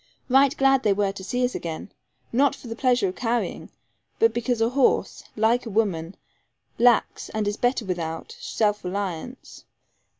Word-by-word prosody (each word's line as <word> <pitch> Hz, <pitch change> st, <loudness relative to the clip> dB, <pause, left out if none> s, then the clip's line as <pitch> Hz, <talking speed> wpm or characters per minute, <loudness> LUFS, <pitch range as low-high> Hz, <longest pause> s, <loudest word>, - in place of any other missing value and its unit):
Right 275 Hz, +3 st, +4 dB
glad 270 Hz, -1 st, +4 dB
they 210 Hz, -4 st, +3 dB
were 200 Hz, 0 st, 0 dB
to 195 Hz, -1 st, -9 dB
see 250 Hz, +5 st, 0 dB
us 250 Hz, -, -2 dB
again 165 Hz, +3 st, -6 dB, 0.4 s
not 275 Hz, +3 st, +3 dB
for -, -, -15 dB
the 225 Hz, -, -5 dB
pleasure 245 Hz, -5 st, +2 dB
of 180 Hz, -, -7 dB
carrying, 240 Hz, -1 st, -2 dB, 0.5 s
but 225 Hz, 0 st, +3 dB
because 240 Hz, 0 st, -1 dB
a 225 Hz, +1 st, +2 dB
horse 265 Hz, +1 st, +1 dB
(like 230 Hz, +3 st, +2 dB
a -, -, -4 dB
woman) 195 Hz, -5 st, -1 dB, 0.6 s
lacks, 240 Hz, -1 st, +3 dB
and 215 Hz, -1 st, -2 dB
is 205 Hz, -, 0 dB
better 245 Hz, -1 st, 0 dB
without, 165 Hz, -3 st, -4 dB
self 210 Hz, -1 st, 0 dB
reliance. 195 Hz, +5 st, -5 dB
225 Hz, 165 wpm, -24 LUFS, 195-245 Hz, 0.6 s, Right